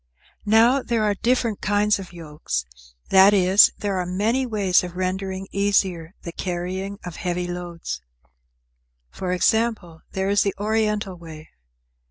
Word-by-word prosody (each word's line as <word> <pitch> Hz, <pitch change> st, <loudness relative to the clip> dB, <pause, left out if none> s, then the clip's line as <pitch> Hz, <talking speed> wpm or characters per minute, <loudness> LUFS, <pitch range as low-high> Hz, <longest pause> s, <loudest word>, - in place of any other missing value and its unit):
Now 230 Hz, +5 st, +5 dB
there 235 Hz, -3 st, -1 dB
are 210 Hz, -1 st, +2 dB
different 230 Hz, 0 st, 0 dB
kinds 205 Hz, +1 st, +2 dB
of 190 Hz, -, -9 dB
yokes, 150 Hz, -, -5 dB, 0.5 s
that 195 Hz, +2 st, +7 dB
is, 190 Hz, +1 st, +6 dB
there 200 Hz, -2 st, -2 dB
are 180 Hz, -, -2 dB
many 220 Hz, +8 st, 0 dB
ways 200 Hz, -6 st, +2 dB
of 180 Hz, -1 st, -7 dB
rendering 190 Hz, +1 st, -3 dB
easier 190 Hz, -4 st, 0 dB
the 170 Hz, -, -6 dB
carrying 185 Hz, +3 st, -4 dB
of 175 Hz, -2 st, -7 dB
heavy 180 Hz, -1 st, -2 dB
loads. 175 Hz, -, -6 dB, 1.1 s
For 185 Hz, -1 st, -4 dB
example, 185 Hz, -3 st, 0 dB
there 190 Hz, +1 st, -1 dB
is 205 Hz, -, +3 dB
the 200 Hz, -, 0 dB
Oriental 210 Hz, -2 st, -1 dB
way. 160 Hz, -2 st, -12 dB
190 Hz, 140 wpm, -23 LUFS, 180-210 Hz, 1.1 s, that